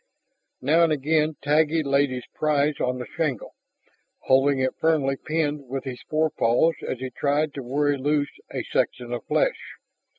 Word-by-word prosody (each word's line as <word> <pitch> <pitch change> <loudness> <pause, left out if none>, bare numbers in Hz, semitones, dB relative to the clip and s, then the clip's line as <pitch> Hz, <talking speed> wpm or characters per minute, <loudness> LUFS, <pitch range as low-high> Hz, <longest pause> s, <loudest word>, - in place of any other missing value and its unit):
Now 160 +5 +4
and 165 - +3
again 155 +1 +1
Taggi 155 +2 +2
laid 140 0 +2
his 125 -1 -5
prize 150 -1 +1
on 125 0 0
the 125 - -5
shingle, 150 -7 -3 0.7
holding 135 +1 +3
it 130 0 0
firmly 150 -4 +2
pinned 150 -1 -2
with 135 0 -3
his 125 -2 -6
forepaws 155 -1 +2
as - - -2
he 130 +1 -6
tried 145 +1 0
to 140 - -5
worry 140 +3 0
loose 145 +1 0 0.2
a - - -3
section 120 -1 -1
of 120 - -4
flesh. - - -1
145 Hz, 160 wpm, -24 LUFS, 130-155 Hz, 0.7 s, Now